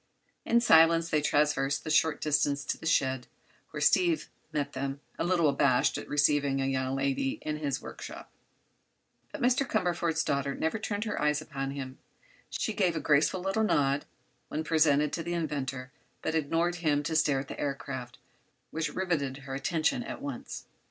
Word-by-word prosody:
In 235 0 +3
silence 165 -4 +5
they 150 - +3
traversed 145 -1 +1
the 155 - -3
short 155 0 +3
distance 145 -1 +1
to - - -1
the 160 - -7
shed, 130 -5 +1 0.4
where - - -6
Steve 345 -3 +3 0.2
met 145 -2 -2
them, 135 +1 -3 0.2
a - - +1
little 175 -2 +3
abashed 140 -3 +3
at - - -5
receiving 145 -1 +2
a 135 - 0
young 130 0 -1
lady 135 0 0
in 150 0 -2
his 145 -3 -3
workshop. - - -9 1.0
But - - -5
Mr. 250 +2 +3
Cumberford's 170 - 0
daughter 140 0 -1
never 160 +7 -1
turned 205 0 -2
her 210 -8 -3
eyes 150 0 +2
upon 140 -3 -4
him. 135 -1 -6 0.5
She 220 - -2
gave 185 -5 +1
a - - 0
graceful 155 +5 +2
little 195 +4 0
nod 140 -8 +2 0.4
when 155 - -3
presented 150 -2 +3
to 170 - -2
the 175 +1 -3
inventor, 135 -5 -3 0.3
but 160 - -1
ignored 165 +3 0
him 150 -3 +1
to 160 +1 -2
stare 145 -3 +3
at 135 - -10
the - - -8
aircraft, 130 -3 -4 0.5
which 160 0 -3
riveted 140 -8 -1
her 135 - -6
attention 160 - 0
at 235 - -6
once. 140 -4 -6
150 Hz, 170 wpm, -29 LUFS, 140-165 Hz, 1.0 s, silence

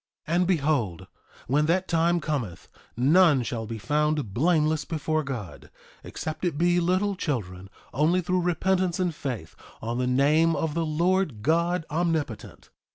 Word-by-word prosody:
3:21 165 - 0
And 180 0 +2
behold, 140 - 0 0.4
when 145 +4 +2
that 185 +3 +1
time 170 +1 +2
cometh, 120 - -4 0.3
none 145 +1 +4
shall 115 -1 -4
be 115 0 -5
found 150 0 -1
blameless 155 - +2
before 155 0 -2
God, 125 -9 -7 0.3
except 155 +2 -6
it 170 -5 -1
be 175 +2 +3
little 185 +4 +1
children, 95 - -4 0.2
only 155 +7 +2
through 180 +1 0
repentance 180 +1 0
and 180 -2 0
faith 125 - -6 0.2
on 115 +2 -3
the 125 - 0
name 150 +6 +3
of 160 -2 -2
the 165 0 -1
Lord 165 - 0
God 170 +2 +1
Omnipotent. 155 -9 -3
155 Hz, 150 wpm, -26 LUFS, 125-175 Hz, 0.4 s, none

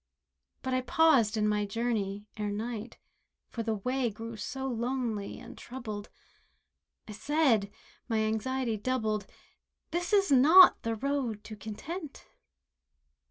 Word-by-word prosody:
But 260 - -2
I 255 - +2
paused 255 -6 +3
in 210 0 +2
my 210 0 +1
journey 205 -2 -2
ere 210 -1 -3
night, 220 +2 -5 0.5
For 230 - -4
the 225 -1 -1
way 250 +4 -1
grew 225 +2 -7
so 265 +5 -5
lonely 235 -4 -2
and - - -11
troubled; 215 -5 -7 1.0
I - - -8
said—my 225 -3 -1
anxiety 220 +2 -1
doubled— 215 -2 -1 0.6
"This 345 +1 -2
is 395 -5 +3
not 315 +8 +8
the 230 0 -2
road 255 -4 -2
to 215 - -8
Content." 275 - -7
230 Hz, 120 wpm, -30 LUFS, 215-265 Hz, 1.0 s, not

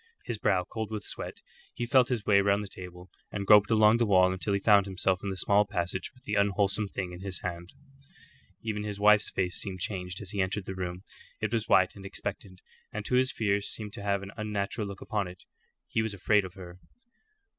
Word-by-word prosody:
His 110 - -3
brow 90 -3 +2
cold 110 +4 -5
with 105 -2 -4
sweat, - - -6 0.3
he 120 - -2
felt 125 0 +4
his 115 -6 -1
way 100 -1 +5
round 100 +1 +2
the - - -6
table, 90 -1 -10 0.2
and 100 -1 -3
groped 105 0 +7
along 110 0 +5
the 120 - +2
wall 95 -2 +5
until 95 +2 -2
he - - +1
found 100 -1 +5
himself 95 -1 0
in 100 - -3
the 95 - -4
small 100 +2 +4
passage 95 -2 -3
with 125 - -24
the 105 - -4
unwholesome 100 +1 +2
thing 95 -2 -4
in 90 - -9
his 95 -2 -5
hand. 85 0 -5 0.9
Even 110 -2 -2
his 105 -1 -5
wife's 105 0 +5
face 90 -1 -1
seemed 95 -3 -4
changed 90 -1 -4
as 100 -2 -5
he 100 - 0
entered 95 +1 -2
the 95 - -5
room. 90 0 -5 0.4
It - - -2
was - - -1
white - - +4
and - - -11
expectant, - - -6 0.3
and - - -5
to - - -3
his 130 +1 +4
fears 100 -2 0
seemed 105 -2 -5
to - - -7
have 100 -1 0
an 100 - -8
unnatural 105 0 -2
look 100 0 -8
upon 105 -3 -2
it. 90 +1 -12 0.4
He 110 - 0
was 110 -2 -2
afraid 105 +1 +3
of 90 - -10
her. 90 -2 -11
100 Hz, 220 wpm, -29 LUFS, 95-105 Hz, 0.9 s, groped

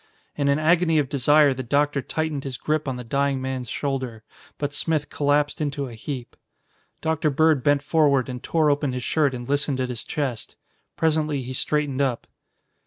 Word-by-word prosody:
In 140 -1 0
an 140 0 +3
agony 165 +1 +3
of 145 -3 +1
desire 145 +1 +4
the 130 - -5
Doctor 140 +3 +1
tightened 155 -1 -2
his 135 -2 -5
grip 155 -1 -1
on 130 - -1
the 125 - -6
dying 140 +3 0
man's 130 -2 -4
shoulder. 130 -6 -3 0.3
But 145 -1 -3
Smith 155 -1 -1
collapsed 145 +2 +1
into 145 -1 -2
a 120 - -9
heap. 125 +2 -6 0.7
Dr. 160 -1 +1
Bird 150 -1 +3
bent 145 -1 +3
forward 145 -4 +3
and 125 -1 -6
tore 155 -3 +2
open 145 -2 0
his 125 -1 -4
shirt 145 -3 +1
and 120 -1 -7
listened 140 -1 0
at 130 -1 -1
his 120 -2 -4
chest. 135 -7 -4 0.4
Presently 155 -3 +1
he 130 +1 -6
straightened 145 0 0
up. 130 -4 0
140 Hz, 180 wpm, -24 LUFS, 130-150 Hz, 0.7 s, desire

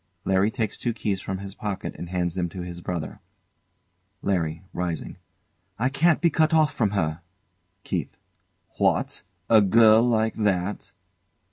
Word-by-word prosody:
LARRY 95 +2 +3
takes 110 -3 -3
two 120 - -1
keys 100 -4 -2
from 95 - -4
his 100 0 -8
pocket 100 -2 -4
and 85 - -7
hands 90 -2 -1
them 90 -1 -2
to 90 +2 -7
his 85 0 -7
brother. 85 -3 -4 1.0
LARRY. 85 -3 -1
[Rising] 85 -3 -4 0.6
I 125 +4 +1
can't 155 +5 +3
be 170 -2 +3
cut 160 +1 +3
off 155 -1 +3
from 110 -4 +1
her! 80 -2 -1 0.6
KEITH. - - -3 0.6
What! - - +1 0.3
A 110 -2 +6
girl 110 +2 +6
like 110 -2 +2
that? 100 -2 -1
100 Hz, 145 wpm, -25 LUFS, 90-115 Hz, 1.0 s, A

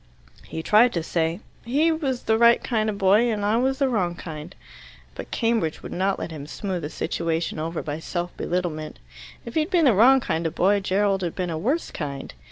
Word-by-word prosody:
He 160 - -5
tried 230 +6 +5
to 170 - -1
say, 165 +3 -1 0.2
"He 290 +8 +2
was 275 -6 -2
the 220 0 +2
right 235 0 +5
kind 220 -3 0
of 205 - -3
boy, 205 +4 +4
and 205 -2 -2
I 215 +2 +2
was 265 +2 +1
the 275 - +2
wrong 185 -8 0
kind." 160 +1 -8 0.6
But - - -8
Cambridge 225 -9 0
would - - -7
not 190 +2 0
let - - -5
him 145 -2 -7
smooth 185 +2 -4
the 150 - -4
situation 165 0 -2
over 165 +1 -3
by 150 +1 -4
self 175 +1 -4
belittlement. 170 -4 -3 0.5
If 235 - -7
he - - +2
had 310 +2 0
been 350 -4 +3
the 255 - +6
wrong 250 +7 +6
kind 165 -8 -1
of 165 - -6
boy, 200 +3 +3
Gerald 195 0 +1
had 175 -3 -3
been 180 -2 -2
a - - -2
worse 275 - -1
kind. 140 -3 -6
195 Hz, 215 wpm, -24 LUFS, 165-235 Hz, 0.6 s, the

